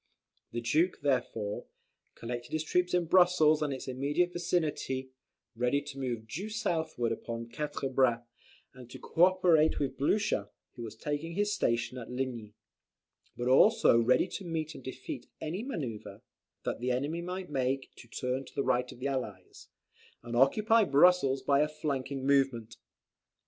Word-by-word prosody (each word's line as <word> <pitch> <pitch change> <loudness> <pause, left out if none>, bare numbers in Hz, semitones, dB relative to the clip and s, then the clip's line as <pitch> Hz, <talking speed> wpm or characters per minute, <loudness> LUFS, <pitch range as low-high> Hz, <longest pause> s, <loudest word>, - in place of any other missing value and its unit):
The 120 - -3
Duke 155 +11 +1
therefore, 115 -7 -1 0.5
collected 120 +2 -6
his 155 0 0
troops 180 +2 +1
in 175 -1 +2
Brussels 170 -3 +5
and 150 -2 0
its 130 0 -5
immediate 145 +7 0
vicinity, 155 -7 -1 0.4
ready 125 +4 +1
to 140 -1 -9
move 120 -4 -3
due 180 - -5
southward 165 - -1
upon 115 0 -5
Quatre 145 +1 -3
Bras, 130 -3 +2 0.5
and 125 -2 -13
co 165 +7 +4
operate 180 -4 +3
with 140 -2 -2
Blucher, 205 +9 +1 0.2
who 120 - -10
was 110 -2 -7
taking 150 +7 -4
his 205 +1 +1
station 120 -7 0
at 115 - -9
Ligny: 125 -4 -4 0.8
but 120 - -2
also 130 - +5
ready 125 +8 +3
to 195 - -6
meet 160 -3 -3
and - - -11
defeat 130 0 -7
any 165 +6 -4
manoeuvre, 115 - -6 0.4
that - - -2
the 125 +2 -2
enemy 145 +7 -1
might 180 0 -5
make 135 -1 -1
to 120 - -13
turn 125 +3 -3
the 140 - 0
right 125 -1 +1
of - - -12
the 130 +3 -3
Allies, 115 -9 -5 0.6
and 120 0 -5
occupy 215 - +4
Brussels 140 -4 +4
by 140 -1 +3
a 150 - +3
flanking 140 -3 -3
movement. 135 -5 +1
135 Hz, 155 wpm, -30 LUFS, 125-165 Hz, 0.8 s, Brussels